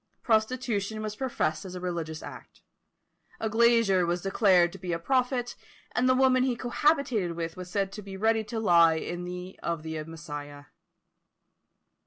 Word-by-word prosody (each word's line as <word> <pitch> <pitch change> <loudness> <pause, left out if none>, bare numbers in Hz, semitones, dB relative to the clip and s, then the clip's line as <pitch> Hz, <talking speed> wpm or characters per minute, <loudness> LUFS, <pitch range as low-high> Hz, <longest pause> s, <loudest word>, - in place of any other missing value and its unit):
Prostitution 220 -2 0
was 215 -1 -4
professed 215 -11 -1
as 185 -1 -8
a - - -5
religious 170 -3 -4
act; - - -11 0.8
a 220 - -2
glazier 230 -5 +4
was 175 +1 -1
declared 190 -3 +4
to - - -10
be 180 -2 -3
a - - 0
prophet, 250 +4 0 0.4
and 255 +1 +1
the 255 - +5
woman 260 -1 +4
he 255 -1 +1
cohabited 245 - +1
with 165 -1 -4
was 180 0 -8
said 195 +1 -1
to 210 - -7
be 195 -1 -8
ready 220 +2 +2
to 225 +1 -4
lie 170 -6 +5
in 180 +2 -5
of 165 -2 -3
the 160 -1 -4
Messiah. 145 -3 -8
195 Hz, 160 wpm, -28 LUFS, 170-235 Hz, 0.8 s, the